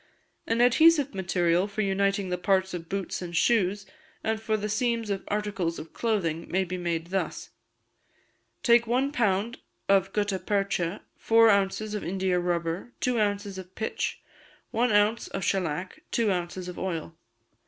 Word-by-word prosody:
An 230 +1 +1
adhesive 290 +3 +5
material 175 -1 +1
for 210 +1 -3
uniting 195 -1 +1
the 180 - -1
parts 190 +1 +1
of 165 -2 -6
boots 195 -2 -3
and 170 -1 -4
shoes, 205 -2 +2 0.4
and 220 0 -1
for 220 -1 0
the 210 0 -3
seams 230 0 0
of 195 -1 -2
articles 200 -5 -2
of 155 +1 -9
clothing, 170 -8 -1
may 190 +1 +1
be 185 0 -4
made 170 -1 -3
thus: 195 - -3 1.1
Take 235 -2 +5
one 260 +4 +1
pound 230 -2 0 0.3
of 195 -1 +3
gutta 205 -2 0
percha, 195 -3 -1
four 225 0 +5
ounces 200 +2 0
of 210 - -3
India 185 0 0
rubber, 175 +5 -2
two 250 -2 +1
ounces 205 -2 -1
of 185 0 -11
pitch, 220 - -3 0.5
one 240 +1 +2
ounce 210 +2 +3
of 195 - -4
shellac, 180 -1 -2
two 225 -3 +1
ounces 180 0 -3
of 180 - -7
oil. 165 -3 -4
195 Hz, 155 wpm, -27 LUFS, 180-220 Hz, 1.1 s, adhesive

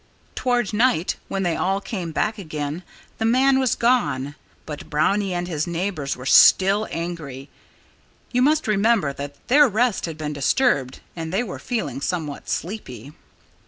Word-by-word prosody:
Toward 245 -4 0
night, 210 -6 +2
when 195 0 -2
they 175 -2 0
all 195 +2 0
came 185 -5 -5
back 215 +7 -1
again, 155 -2 -4 0.4
the - - -1
man 260 +4 +4
had 260 -3 +1
gone. 230 - +1 0.3
But 150 -2 -8
Brownie 195 +6 +1
and 175 0 -2
his 155 -3 -2
neighbors 170 -6 -3
were 125 - -9
still 195 +9 +6
angry. 155 -6 -6 0.8
You 250 - +1
must 305 +3 +3
remember 210 -7 +2
that 145 +1 -7
their 285 +3 +6
rest 225 -3 0
had 160 -2 -6
been 150 -1 -4
disturbed 140 - +1
and 160 -1 -5
they 195 +6 0
were 200 - -7
feeling 145 - -3
somewhat 155 -4 -4
sleepy. 145 - -5
180 Hz, 155 wpm, -22 LUFS, 150-225 Hz, 0.8 s, still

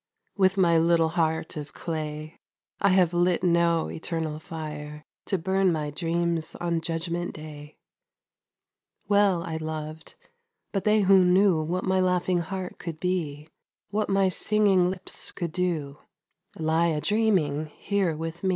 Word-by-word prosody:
With 190 -1 +3
my 170 -3 +4
little 165 0 +3
heart 160 -1 -1
of 145 -1 -7
clay 155 -1 -5 0.4
I 200 - +3
have 180 -2 +3
lit 175 0 +2
no 170 -2 +2
eternal 160 -2 -4
fire 150 -3 -7 0.2
To 195 - +1
burn 190 +2 +1
my 150 -3 -2
dreams 170 +1 -1
on 170 -1 -1
Judgment 170 +1 -3
Day! 150 -1 -10 1.3
Well 200 -4 +3
I 160 -1 -4
loved, 155 0 -6 0.6
but 195 - -2
they 215 0 +4
who 190 -1 +6
knew 180 -2 +4
What 175 +4 -2
my 190 0 +1
laughing 180 -1 +1
heart 185 +2 -5
could 165 -3 -6
be, 160 -5 -2 0.4
What 210 +1 -1
my 195 -1 +3
singing 195 -1 +2
lips 185 0 -2
could 170 -2 -4
do, 155 -6 -2 0.6
Lie 160 +1 +2
a 155 -2 0
dreaming 185 -9 +1
here 185 0 -1
with 165 +2 -6
me. 190 - +1
170 Hz, 140 wpm, -26 LUFS, 155-185 Hz, 1.3 s, who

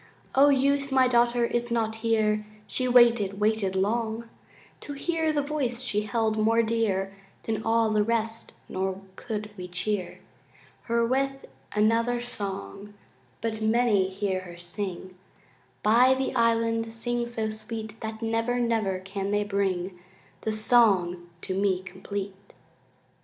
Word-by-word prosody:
O 280 +2 +6
Youth, 280 0 +2
my 260 -1 +5
daughter 240 -1 +3
is 240 0 -1
not 225 -1 0
here 215 -2 +1 0.2
She 255 - -1
waited, 235 -5 +5
waited 210 -3 +1
long 225 +3 -1 0.5
To 290 - -7
hear 320 +2 0
the 295 -2 0
voice 265 -5 -2
she 210 -4 0
held 220 0 0
more 225 +2 +3
dear 210 -4 0 0.3
Than 220 -1 -2
all 225 0 +2
the 215 -1 +3
rest 225 0 -2 0.2
nor 190 0 -2 0.2
could 210 -1 -5
we 180 -1 -6
cheer 185 +1 -3 0.7
Her 235 0 +2
with 270 +2 -1 0.3
another 230 +3 +2
song; 205 -3 -6 0.5
But 220 -1 -3
many 220 -3 +3
hear 190 -1 -1
her 175 -2 -10
sing 185 +1 -6 0.7
By 245 +5 +5
the 265 0 -2
island, 230 -1 +1
sing 240 +1 -2
so 225 -2 -2
sweet 220 0 -7
That 220 0 -5
never, 230 +2 0
never 225 -5 +1
can 195 +1 -4
they 205 0 +1
bring 190 -3 -1 0.4
The 220 - -1
song 195 -6 +3
to - - -3
me 190 -1 +1
complete. 195 +1 -7
220 Hz, 135 wpm, -27 LUFS, 200-235 Hz, 0.7 s, O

